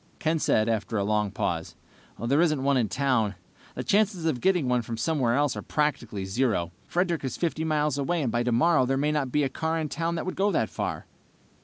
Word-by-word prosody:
Ken 160 +1 0
said, 110 -6 +2
after 110 0 -1
a 100 - +1
long 105 0 +1
pause, - - -3 0.4
"There 130 - +2
isn't 155 -6 +2
one 140 0 +3
in 120 -5 +1
town. 125 -7 +1 0.4
The - - -3
chances 200 -4 +1
of 135 -7 0
getting 180 -8 +2
one 125 -1 +2
from 115 0 -5
somewhere 125 -3 +1
else 145 0 +1
are - - -4
practically 120 -10 -1
zero. 95 -5 0 0.2
Frederick 175 -3 0
is 130 - -3
50 160 -2 -1
miles 150 -2 +1
away 165 +3 0
and 120 - 0
by 120 - +1
tomorrow 125 +4 +3
there 135 +1 +1
may 150 +2 +1
not 145 -4 -1
be 150 +2 +2
a - - +2
car 160 +4 -2
in 155 -2 -2
town 165 +2 -2
that 165 - -3
would 185 - -3
go 200 +1 +2
that 115 - 0
far." - - -3
140 Hz, 220 wpm, -27 LUFS, 120-160 Hz, 0.4 s, one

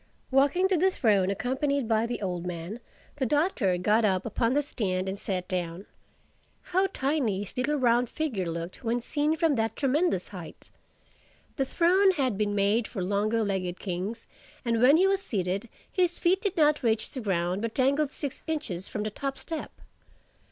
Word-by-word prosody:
Walking 285 +8 +4
to 380 -2 +2
the 375 +4 +4
throne 205 - +2
accompanied 265 +5 -1
by 225 0 +2
the 240 -3 -4
old 180 -2 -2
man, 180 +5 -5 0.4
the 265 - 0
Doctor 290 - +1
got 210 +5 +2
up 190 -3 +1
upon 230 +2 0
the 290 +1 +2
stand 190 -9 -2
and 190 - -2
sat 185 -2 -3
down. 180 +1 -3 0.9
How 380 +2 +4
tiny 265 - 0
his 205 - -6
little 270 +4 0
round 245 -3 +2
figure 245 - -2
looked 170 +6 -5
when 235 +1 0
seen 295 +5 +1
from 320 -1 +2
that 225 0 0
tremendous 285 - +1
height! 180 -5 -10 0.8
The 270 - 0
throne 365 +7 +4
had 265 - 0
been 205 0 0
made 205 +3 +2
for 190 -6 -4
longer 210 +4 +1
legged 190 -3 -2
kings; 190 +4 -4 0.4
and 230 -1 +1
when 275 +5 +7
he 370 - +4
was 390 0 +2
seated, 195 - -2 0.2
his 355 -2 +1
feet 370 +3 +2
did 390 -3 -2
not 300 -1 +4
reach 220 -3 0
the 260 - -5
ground 185 -2 0
but 230 0 -3
dangled 280 +2 +2
six 285 -3 -4
inches 240 - -3
from 210 - -4
the 215 - -3
top 275 +5 -4
step. 325 -2 -5
230 Hz, 180 wpm, -28 LUFS, 195-290 Hz, 0.9 s, when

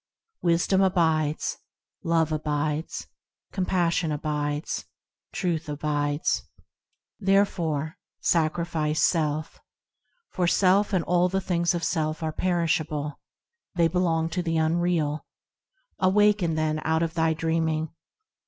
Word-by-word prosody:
Wisdom 175 +3 +2
abides; 160 -5 +1 0.5
Love 165 -1 +2
abides; 150 0 -2 0.5
Compassion 175 -3 0
abides; 150 0 -2 0.5
Truth 170 -4 -2
abides; 145 0 0 0.8
Therefore 170 -7 +1 0.2
sacrifice 160 -1 0
self, 155 -2 0 0.7
For 180 -2 0
self 195 +3 +3
and 185 -4 +1
all 180 +1 +2
the 190 +1 0
things 175 -2 0
of 170 - -3
self 160 -1 -1
are 155 -1 -2
perishable, 155 -5 -1 0.6
They 170 -1 +4
belong 165 -1 +1
to 180 - -2
the 165 -2 -1
unreal! 160 -2 0 0.7
Awake, 205 +3 +4
then, 155 -3 0
out 160 +1 +1
of 165 -1 -2
thy 160 -1 +1
dreaming! 160 -1 -1
165 Hz, 105 wpm, -26 LUFS, 155-175 Hz, 0.8 s, They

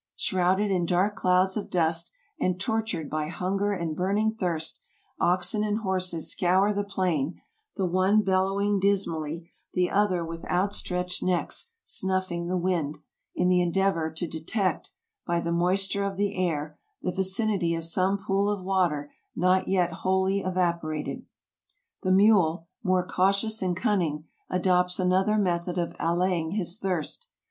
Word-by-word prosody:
Shrouded 190 +3 +1
in 175 -3 +1
dark 190 +4 +1
clouds 185 -1 +2
of 210 - -4
dust, 165 -1 +1 0.3
and 185 0 0
tortured 220 -6 -2
by 155 0 -2
hunger 195 +4 -1
and 170 -5 -2
burning 205 +5 +1
thirst, 170 -7 -2 0.4
oxen 185 +4 +2
and 210 +1 -1
horses 185 -4 0
scour 190 +3 +2
the 205 0 -1
plain, 180 -6 -1 0.4
the 195 - +1
one 185 +4 +3
bellowing 195 +1 +1
dis 200 0 +3
mally, 160 +1 -5 0.2
the 180 -1 +1
other 190 -4 +1
with 165 0 -7
outstretched 180 -1 0
necks 185 - -1
snuffing 185 -2 0
the 185 +1 0
wind, 170 -5 -1 0.4
in 180 - +1
the 180 0 +4
endeavor 175 -2 +1
to 160 +2 -2
detect, 185 +5 -2 0.4
by 170 -1 +1
the 170 0 -2
moisture 190 +3 +1
of 200 -1 -3
the 205 0 0
air, 155 -4 -2 0.2
the 180 - 0
vicinity 190 -1 +1
of 165 0 -3
some 185 +4 +2
pool 200 0 0
of 205 -3 -2
water 175 -7 0 0.2
not 185 +2 +2
yet 180 -2 +2
wholly 190 +2 +1
evaporated. 170 -5 -2 0.7
The 185 - 0
mule, 185 -5 +4 0.2
more 185 -3 +1
cautious 195 +4 +1
and 180 -2 -1
cunning, 165 -8 0 0.2
adopts 180 0 +2
another 190 +3 +2
method 175 -2 0
of 170 -1 -2
allaying 170 0 0
his 190 -1 -1
thirst. 190 - -3
185 Hz, 145 wpm, -27 LUFS, 170-195 Hz, 0.7 s, the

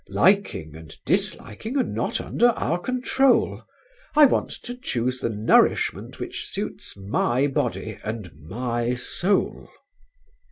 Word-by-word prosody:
Liking 185 - +2
and 80 0 -11
disliking 225 - -1
are 265 - +4
not - - -2
under 240 - +2
our 175 -7 0
control. 255 +4 +2 0.5
I 300 0 +9
want 270 - +2
to 245 - -6
choose 125 - -2
the 115 - -1
nourishment 110 0 +2
which - - -5
suits - - -5
my 115 +6 +1
body 140 - -2
and 110 -5 -5
my 120 - -2
soul." 180 +10 -1
125 Hz, 120 wpm, -24 LUFS, -, 0.5 s, I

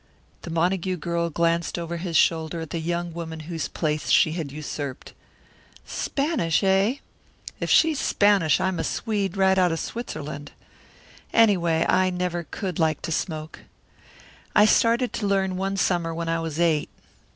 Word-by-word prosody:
The - - -8
Montague 180 +2 0
girl 170 0 -1
glanced 170 +1 0
over 170 0 -4
his 170 -1 -1
shoulder 160 0 +2
at 160 - -7
the 165 - -2
young 170 +1 -3
woman 160 -1 -6
whose 165 +1 -4
place 155 -2 -2
she 160 - +5
had 160 -4 -4
usurped. 145 -2 -6 0.7
"Spanish, 275 - -1
eh? 195 +5 +3 0.6
If - - -3
she's 315 -3 +4
Spanish 200 -6 +3
I'm 190 -2 -1
a - - 0
Swede 205 -4 -2
right 190 0 +4
out 180 -2 +3
of 165 - -2
Switzerland. 145 -11 -6 0.8
Any 225 -3 +5
way, 165 -2 +1
I 185 0 +3
never 180 -1 -2
could 185 -5 -4
like 155 -2 +1
to - - -3
smoke. 155 -1 -3 1.0
I 210 - +7
started 235 +3 +3
to 205 - -2
learn 190 -1 +1
one 195 +1 -2
summer 170 -4 0
when 165 0 -3
I 165 0 0
was 165 -1 -4
eight. 160 -3 +2
170 Hz, 160 wpm, -24 LUFS, 160-190 Hz, 1.0 s, I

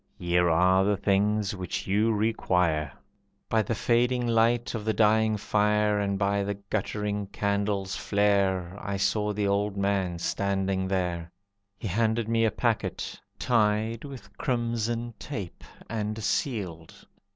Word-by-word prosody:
Here 90 0 +2
are 90 +3 +4
the 100 0 +1
things 100 +1 +1
which 90 -2 -4
you 105 +4 +2
require." 90 -9 +1 0.6
By 110 - +3
the 110 +2 -2
fading 120 +2 +2
light 115 +1 +2
of 115 -3 -3
the 110 -1 0
dying 110 0 +3
fire, 105 0 +2
And 100 -1 0
by 100 0 +1
the 100 +1 -2
guttering 105 0 -3
candle's 100 -1 -1
flare, 100 -3 +1
I 100 -1 -3
saw 105 +2 +1
the 105 0 -1
old 100 0 0
man 100 -3 0
standing 95 +1 -1
there. 90 -3 -2 0.5
He 105 - -5
handed 110 +3 +1
me 115 0 +2
a - - +4
packet, - - -2 0.2
tied 110 -1 +1
With 125 -8 -10
crimson 120 -4 -1
tape, 105 -12 -6 0.2
and 110 -1 -3
sealed. 95 - -3
105 Hz, 135 wpm, -27 LUFS, 95-110 Hz, 0.6 s, are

